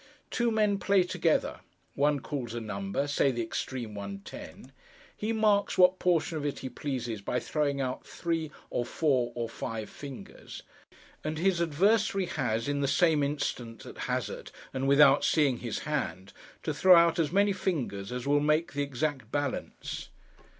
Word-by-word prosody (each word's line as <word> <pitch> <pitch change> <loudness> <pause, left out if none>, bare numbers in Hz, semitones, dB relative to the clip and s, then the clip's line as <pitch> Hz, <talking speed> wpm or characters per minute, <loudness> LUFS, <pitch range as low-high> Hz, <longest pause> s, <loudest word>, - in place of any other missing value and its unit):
Two 235 -1 +1
men 210 -3 +2
play 195 -2 +4
together. 180 - 0 0.3
One 145 0 +2
calls 125 -6 -4
a - - -2
number—say 110 +7 0
the 120 -3 -1
extreme 115 0 -4
one, 100 -1 -6
ten. 130 - -10 0.4
He 215 +2 -2
marks 215 -2 +2
what 180 0 +6
portion 165 -2 +1
of - - -5
it 145 -1 -2
he - - -2
pleases 125 -5 -4
by 125 +5 -1
throwing 145 -2 -1
out 130 -1 -2
three, 165 -2 -2 0.2
or 120 - 0
four, 130 -1 +1
or 120 -1 -2
five 110 -1 -5
fingers; 140 -3 -9 0.6
and 155 0 -3
his 175 +1 +2
adversary 195 +5 +2
has, 115 -8 -1
in 145 0 0
the 140 - +1
same 160 0 +3
instant, 140 -5 -3
at - - -10
hazard, - - -3 0.2
and 135 0 -1
without 140 0 +6
seeing 145 -6 +3
his 120 -3 -3
hand, 95 - -3 0.3
to 155 - -1
throw 185 +5 +7
out 170 0 +5
as 155 -3 +1
many 200 +2 +3
fingers, 125 - -2
as 125 +1 -4
will 145 +1 +3
make 150 +2 +1
the 145 - -1
exact 140 -3 -2
balance. 145 -2 -3
145 Hz, 165 wpm, -29 LUFS, 120-170 Hz, 0.6 s, throw